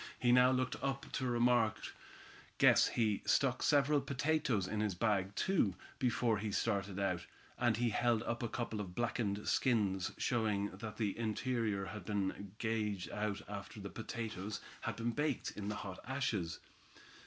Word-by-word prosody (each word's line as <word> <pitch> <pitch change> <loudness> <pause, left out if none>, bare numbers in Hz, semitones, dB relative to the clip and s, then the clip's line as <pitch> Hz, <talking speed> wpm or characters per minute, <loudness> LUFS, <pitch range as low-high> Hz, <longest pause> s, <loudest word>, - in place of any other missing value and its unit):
He 120 -1 +3
now 125 +1 +7
looked 130 0 0
up 135 0 -2
to 130 - -1
remark: 120 -2 +3 0.8
"Guess - - +6
he 110 -4 +1
stuck 130 -3 +2
several 145 0 +4
potatoes 140 -8 0
in 110 - -2
his 105 -3 0
bag, 100 -1 +1
too, 140 - +2 0.2
before 120 -3 +2
he 105 0 -2
started 100 -3 0
out," 90 -3 -1 0.3
and 120 -3 +3
he 120 0 +2
held 120 0 +2
up 120 +1 -2
a 120 - -1
couple 110 -2 -3
of 90 -3 -7
blackened 110 -3 -1
skins, 100 -7 +2
showing 105 -4 0
that 110 +2 -7
the 105 -4 0
interior 115 -3 -1
had 100 +4 -7
been 100 -1 -2
gauged 105 -4 -1
out 105 -1 -2
after - - -7
the - - -6
potatoes 110 -3 -4 0.2
had - - -3
been 115 +1 -1
baked 145 +1 -1
in 100 -1 -6
the 105 - -2
hot 95 -2 -6
ashes. 115 -10 -1
110 Hz, 160 wpm, -36 LUFS, 100-120 Hz, 0.8 s, now